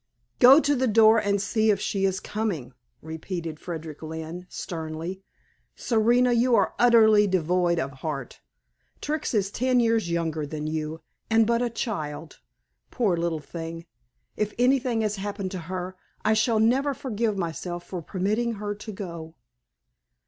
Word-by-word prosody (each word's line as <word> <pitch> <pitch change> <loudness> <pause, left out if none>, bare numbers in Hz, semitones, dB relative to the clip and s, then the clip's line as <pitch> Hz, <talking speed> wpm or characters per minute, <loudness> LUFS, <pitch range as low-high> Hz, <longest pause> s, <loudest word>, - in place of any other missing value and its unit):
"Go 265 +4 +9
to 290 -2 +2
the 260 0 +1
door 225 0 +6
and 200 -1 0
see 215 +2 +1
if 205 - +3
she 195 -2 -1
is 190 0 0
coming," 190 - -3 0.3
repeated 160 0 -5
Frederick 160 -3 -7
Lynne 160 +3 -7
sternly. 165 +2 -5 0.5
"Serena 240 +2 +3
you 240 +1 +3
are - - +2
utterly 220 -3 +6
devoid 180 -1 +1
of 140 -4 -2
heart. 135 +1 -6 0.6
Trix 300 -4 -2
is 200 -1 +1
ten 255 +2 +2
years 225 -5 +2
younger 165 -3 -1
than 150 +1 -5
you 155 +1 -3 0.3
and 225 0 +4
but 235 +1 +1
a 245 - 0
child. 160 - -5 0.5
Poor 210 -8 +1
little 170 -1 -1
thing! 165 +1 -7 0.5
if 210 -1 -2
anything 250 -2 +2
has 215 -1 -1
happened 200 -1 -4
to 185 - -4
her 185 0 -4 0.3
I 215 - +4
shall 220 +1 +2
never 265 +5 +2
forgive 225 -5 -2
myself 175 0 -4
for 180 -2 -5
permitting 210 +8 -1
her 205 -1 -4
to 210 +2 -8
go." 170 -5 -7
200 Hz, 150 wpm, -26 LUFS, 165-225 Hz, 0.6 s, Go